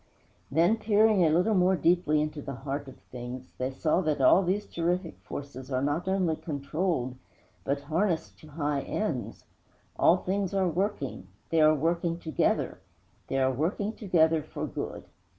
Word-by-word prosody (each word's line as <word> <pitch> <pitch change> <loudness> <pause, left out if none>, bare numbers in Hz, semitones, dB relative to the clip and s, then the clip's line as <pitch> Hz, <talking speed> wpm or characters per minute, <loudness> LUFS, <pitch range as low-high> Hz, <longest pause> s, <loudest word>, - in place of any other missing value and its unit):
_' - - -36 0.5
Then, 170 +10 +3
peering 215 -2 +4
a 160 - +4
little 180 +7 +3
more 185 -1 +4
deeply 165 -4 +2
into 150 -1 -4
the 140 -1 -6
heart 140 +2 -4
of 135 - -11
things, 125 +1 -7
they 130 +1 0
saw 155 +6 +1
that 155 -4 0
all 135 +8 +6
these 195 +3 0
terrific 170 +1 -2
forces 135 -1 -8
are 130 0 0
not 145 +6 -1
only 185 -4 +1
controlled, 145 -3 -2 0.5
but 140 +1 -1
harnessed 165 +4 -1
to 155 - -14
high 145 -2 -1
ends. 155 - -3 0.5
All 175 - +6
things 195 +1 -2
are 190 -1 +2
working 175 - -2 0.2
they 165 -1 +4
are 155 0 +6
working 170 +2 0
together 160 -4 0 0.5
they 135 - -1
are 130 0 +3
working 190 - -1
together 165 -7 +2
for - - -5
good! - - -5
160 Hz, 165 wpm, -28 LUFS, 140-185 Hz, 0.5 s, all